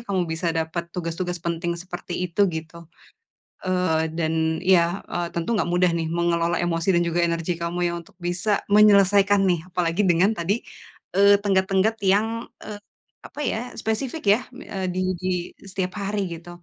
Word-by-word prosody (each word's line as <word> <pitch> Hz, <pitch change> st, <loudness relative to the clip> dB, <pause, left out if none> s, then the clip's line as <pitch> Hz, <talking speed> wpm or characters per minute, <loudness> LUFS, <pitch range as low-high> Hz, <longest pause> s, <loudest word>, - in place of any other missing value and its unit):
kamu 190 Hz, -3 st, +1 dB
bisa 160 Hz, +2 st, -3 dB
dapat 160 Hz, +1 st, -2 dB
tugas-tugas 175 Hz, +1 st, -3 dB
penting 170 Hz, 0 st, -1 dB
seperti 175 Hz, -1 st, -7 dB
itu 175 Hz, +4 st, -4 dB, 0.2 s
gitu, 160 Hz, +1 st, -8 dB, 0.9 s
eee, 180 Hz, -4 st, +1 dB
dan 160 Hz, -1 st, 0 dB, 0.4 s
ya, 175 Hz, +2 st, +3 dB
eee, 175 Hz, 0 st, -1 dB
tentu 170 Hz, +3 st, -3 dB
enggak 190 Hz, -4 st, 0 dB
mudah 180 Hz, -1 st, +3 dB
nih 165 Hz, -1 st, -2 dB
mengelola 170 Hz, 0 st, +1 dB
emosi 165 Hz, +1 st, -1 dB
dan 175 Hz, -, +3 dB
juga 170 Hz, +1 st, 0 dB
energi 170 Hz, +1 st, -1 dB
kamu 170 Hz, +1 st, -2 dB
ya 170 Hz, -, -2 dB
untuk 170 Hz, -, -17 dB
bisa 190 Hz, +4 st, 0 dB
menyelesaikan 200 Hz, -1 st, +5 dB
nih 175 Hz, -2 st, +2 dB
apalagi 175 Hz, +2 st, 0 dB
dengan 175 Hz, +5 st, +4 dB
tadi, 190 Hz, +7 st, 0 dB, 0.6 s
eee, 200 Hz, +1 st, +7 dB
tenggat-tenggat 195 Hz, +2 st, +2 dB
yang, 200 Hz, +3 st, +4 dB, 0.4 s
eee, 210 Hz, -1 st, -7 dB, 0.5 s
apa 295 Hz, -, -8 dB
ya -, -, -1 dB, 0.2 s
spesifik 240 Hz, +8 st, -3 dB
ya, 250 Hz, -, -7 dB
eee, 190 Hz, -6 st, -5 dB
di 185 Hz, -, -1 dB, 0.2 s
di 185 Hz, -, -1 dB, 0.4 s
setiap 185 Hz, -1 st, -3 dB
hari 200 Hz, +1 st, -1 dB
gitu, 170 Hz, +1 st, -10 dB
180 Hz, 160 wpm, -24 LUFS, 170-200 Hz, 0.9 s, eee